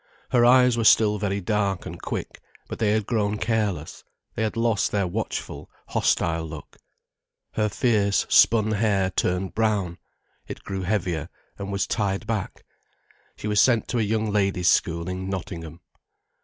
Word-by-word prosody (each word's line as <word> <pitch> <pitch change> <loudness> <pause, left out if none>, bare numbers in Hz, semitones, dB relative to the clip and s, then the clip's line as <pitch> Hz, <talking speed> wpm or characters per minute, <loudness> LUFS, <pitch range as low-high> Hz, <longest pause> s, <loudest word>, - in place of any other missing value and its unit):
Her 120 -1 +4
eyes 125 0 +5
were - - +1
still 105 -1 +5
very 100 -1 -1
dark 100 -1 -1
and - - -8
quick, - - -5 0.3
but - - -7
they 110 - +2
had 110 0 +1
grown 105 -2 0
careless, 105 -9 -2 0.3
they - - -4
had 110 0 -1
lost 115 -3 +1
their 100 -2 +1
watchful, 105 +5 -4 0.2
hostile 80 -1 +1
look. 80 -1 -9 0.8
Her 105 0 0
fierce, 105 -3 +1
spun 110 -1 +4
hair 100 -3 +1
turned 90 +1 -1
brown, 100 -6 0 0.5
it - - -8
grew 95 -1 -4
heavier 90 -5 -2 0.3
and 100 0 -5
was 100 0 0
tied 100 -1 -1
back. 110 -3 -4 0.7
She - - -6
was 105 -2 +3
sent 120 -1 +3
to 120 - 0
a - - +2
young 110 0 0
ladies' 95 -3 +1
school 85 0 +1
in 95 +1 -4
Nottingham. 85 -3 -6
100 Hz, 155 wpm, -24 LUFS, 95-110 Hz, 0.8 s, eyes